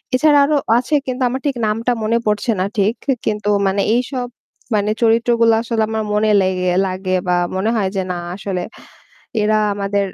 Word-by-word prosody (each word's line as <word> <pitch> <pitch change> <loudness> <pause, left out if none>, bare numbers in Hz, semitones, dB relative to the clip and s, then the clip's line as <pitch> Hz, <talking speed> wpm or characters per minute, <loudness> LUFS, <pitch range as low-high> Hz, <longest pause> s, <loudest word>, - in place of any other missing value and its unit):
এছাড়া 290 +2 +4
আরও 300 0 +1 0.2
আছে 255 +5 0
কিন্তু 255 +1 -3
আমার 260 +2 -4
ঠিক 280 -3 0
নামটা 225 +3 0
মনে 230 +2 +1
পড়ছে 210 +2 0
না 185 - +1
ঠিক। 205 +2 +2 0.3
কিন্তু 210 -1 -1 0.2
মানে 195 +1 +1
এইসব 250 +1 -1 0.5
মানে 210 +1 +1
চরিত্রগুলো 230 0 +3
আসলে 230 -1 -2
আমার 220 0 -2
মনে 215 +1 +2
লেগে 185 -1 0 0.2
লাগে 185 0 -2
বা 180 - +2 0.2
মনে 200 +4 0
হয় 195 -3 0
যে 190 - 0
না 180 - -3 0.2
আসলে 190 -2 -4 0.8
এরা 215 +1 +2 0.2
আমাদের 200 0 -1
215 Hz, 170 wpm, -18 LUFS, 195-240 Hz, 0.8 s, এছাড়া